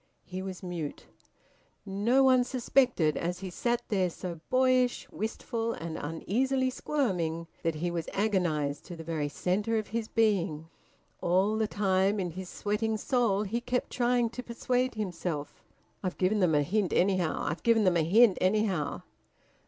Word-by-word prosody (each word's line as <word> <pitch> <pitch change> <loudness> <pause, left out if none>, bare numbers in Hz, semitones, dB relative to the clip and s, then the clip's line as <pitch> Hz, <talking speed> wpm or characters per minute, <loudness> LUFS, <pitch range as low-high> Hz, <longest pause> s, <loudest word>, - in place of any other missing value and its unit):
He 185 0 -6
was 190 0 -6
mute. 170 -5 -5 0.8
No 210 +7 +2
one 255 -1 +5
suspected, 245 - +2
as 175 +2 -3
he 190 -2 -5
sat 240 +6 -1
there, 190 -4 +2
so 170 -1 -6
boyish, 255 -1 +2
wistful, 225 +2 -3
and 165 -1 -6
uneasily 255 - 0
squirming, 180 - -1 0.2
that 165 -1 0
he 170 +3 -2
was 170 -2 -3
agonised 170 -9 0
to 175 - -8
the 165 - -8
very 155 -3 -2
centre 205 +8 0
of 215 - -3
his 225 0 -2
being. 185 -9 +1 0.5
All 190 +5 +2
the 220 0 +1
time, 195 0 +1
in 180 -3 -2
his 185 +2 -7
sweating 215 +1 -1
soul, 215 -3 +1
he 225 +4 -2
kept 250 +1 -2
trying 245 -1 +1
to 250 - -5
persuade 250 +1 -1
himself: 175 -7 -4 0.4
"I've 185 -2 -3
given 195 +3 +2
them 175 -5 +3
a 145 - +3
hint, 195 +4 0
anyhow! 185 -3 +1
I've 165 - -2
given 230 -2 +4
them 180 -3 +3
a - - +3
hint, 200 +5 +5
anyhow!" 190 -5 +1
195 Hz, 160 wpm, -29 LUFS, 175-230 Hz, 0.8 s, one